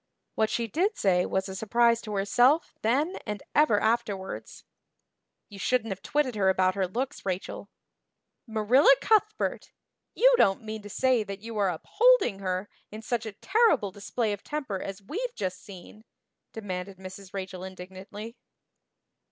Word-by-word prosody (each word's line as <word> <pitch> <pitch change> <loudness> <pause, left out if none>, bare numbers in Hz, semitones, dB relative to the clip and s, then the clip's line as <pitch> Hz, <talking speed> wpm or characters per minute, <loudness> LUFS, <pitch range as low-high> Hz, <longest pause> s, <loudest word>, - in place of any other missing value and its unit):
What 220 -1 +1
she 235 - -1
did 350 - 0
say 180 -2 +2
was 190 +1 -1
a 190 - -6
surprise 235 +3 +2
to 210 -2 -5
herself 245 +10 +3
then 285 - +1
and 210 -2 -4
ever 295 -9 +4
afterwards. 220 -4 -2 0.8
"You 200 -2 -12
shouldn't 225 +1 0
have 190 - -5
twitted 290 -4 0
her 195 -3 +2
about 185 0 +3
her 190 -1 0
looks, 250 +8 -4
Rachel." 190 +1 -4 0.8
"Marilla 235 - +5
Cuthbert, 430 0 +1 0.4
you - - +6
don't 195 +3 +3
mean 220 0 -6
to 205 - -10
say 255 +2 +2
that 195 -1 -7
you 230 0 -7
are 200 -2 +3
upholding 245 - +3
her 185 0 -2 0.2
in 215 +1 -9
such 235 -1 -2
a 215 - -6
terrible 375 - +2
display 210 +3 -2
of 205 - -7
temper 270 -11 -4
as 195 0 -7
we've 465 - -4
just 185 -2 -4
seen?" 200 +2 -12 0.5
demanded 190 -3 -6
Mrs. 190 0 -10
Rachel 185 -2 -6
indignantly. 190 +4 -9
210 Hz, 150 wpm, -27 LUFS, 190-245 Hz, 0.8 s, you